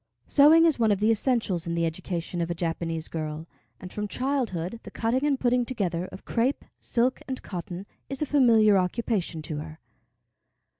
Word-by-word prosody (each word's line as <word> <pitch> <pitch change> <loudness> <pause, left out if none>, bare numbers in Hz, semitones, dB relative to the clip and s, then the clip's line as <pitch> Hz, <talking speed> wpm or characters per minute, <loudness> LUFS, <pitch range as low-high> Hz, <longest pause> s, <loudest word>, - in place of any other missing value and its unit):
Sewing 310 +3 +7
is 320 -6 +3
one 220 -2 +3
of 200 - +1
the 215 +2 +3
essentials 220 -7 0
in 170 - -1
the 170 0 +1
education 170 +1 -3
of 170 - -2
a 170 - -2
Japanese 165 -1 -3
girl, 155 0 -5 0.3
and 185 - -9
from 210 0 -3
childhood 230 -7 -2
the - - -10
cutting 240 +4 -1
and 285 -3 +1
putting 245 0 +2
together 185 -8 -2
of 190 - -12
crêpe, 245 +4 0 0.2
silk, 250 +2 0
and 260 -1 -5
cotton 180 0 -6 0.2
is 275 -1 -4
a 300 - +1
familiar 225 -8 +5
occupation 180 -4 -1
to 150 -1 -4
her. 155 +1 -8
205 Hz, 180 wpm, -26 LUFS, 170-250 Hz, 0.3 s, Sewing